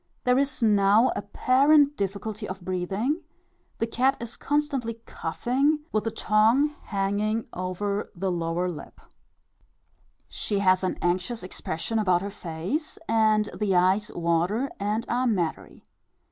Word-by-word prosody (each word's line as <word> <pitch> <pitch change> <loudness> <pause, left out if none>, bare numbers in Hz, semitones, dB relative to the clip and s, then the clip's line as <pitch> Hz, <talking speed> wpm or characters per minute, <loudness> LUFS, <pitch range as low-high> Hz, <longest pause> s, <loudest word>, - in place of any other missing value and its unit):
There 250 +1 +3
is 275 -3 -1
now 210 +2 +4
apparent 280 +7 +3
difficulty 205 +1 -3
of 190 +1 -6
breathing, 190 - -1 0.6
the - - 0
cat 255 +4 +1
is 235 -1 -6
constantly 285 -6 -1
coughing, 270 - 0
with 215 0 0
the - - +1
tongue 225 +7 +3 0.2
hanging 205 +3 -1
over 200 +3 -3
the 190 +1 -1
lower 170 +1 -1
lip; 170 -4 -8 1.3
she 205 - -3
has 185 -1 +3
an 185 - -1
anxious 180 +7 -1
expression 185 +4 -3
about 185 -3 +2
her 200 - -4
face, 185 - -4
and 215 -1 +3
the 200 -3 0
eyes 190 +4 +3
water 175 +10 0
and 210 +3 -1
are 250 +2 +1
mattery. 180 -8 -2
210 Hz, 130 wpm, -26 LUFS, 185-240 Hz, 1.3 s, now